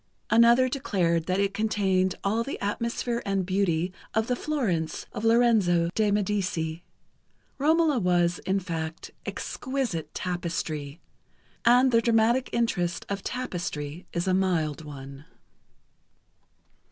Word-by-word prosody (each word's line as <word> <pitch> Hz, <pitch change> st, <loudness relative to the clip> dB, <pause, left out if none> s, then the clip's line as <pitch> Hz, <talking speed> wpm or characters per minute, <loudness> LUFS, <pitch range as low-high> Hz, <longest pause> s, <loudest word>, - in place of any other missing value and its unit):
Another 235 Hz, +3 st, +6 dB
declared 180 Hz, -, 0 dB
that 185 Hz, +1 st, +1 dB
it 200 Hz, 0 st, +1 dB
contained 195 Hz, -3 st, +1 dB
all 220 Hz, +4 st, +1 dB
the 275 Hz, -, -5 dB
atmosphere 235 Hz, +3 st, -2 dB
and 195 Hz, -2 st, -1 dB
beauty 185 Hz, -2 st, 0 dB, 0.2 s
of 220 Hz, 0 st, +2 dB
the 250 Hz, -, 0 dB
Florence 220 Hz, -, -2 dB
of 210 Hz, -, -5 dB
Lorenzo 220 Hz, -8 st, +3 dB
de 215 Hz, -1 st, +2 dB
Medici. 190 Hz, -5 st, -1 dB, 0.8 s
"Romola" 310 Hz, -1 st, +3 dB
was, 175 Hz, -2 st, +2 dB
in 195 Hz, +1 st, 0 dB
fact, 165 Hz, -3 st, -5 dB, 0.2 s
exquisite 255 Hz, -, -3 dB
tapestry, 165 Hz, -4 st, -3 dB, 0.7 s
and 250 Hz, +2 st, +6 dB
the 230 Hz, -1 st, +4 dB
dramatic 235 Hz, +2 st, +2 dB
interest 180 Hz, -7 st, -1 dB
of 200 Hz, -1 st, -2 dB
tapestry 175 Hz, -, -4 dB
is 170 Hz, +2 st, -2 dB
a 185 Hz, -, +3 dB
mild 165 Hz, -5 st, 0 dB
one. 140 Hz, -1 st, -10 dB
195 Hz, 115 wpm, -27 LUFS, 170-230 Hz, 0.8 s, Another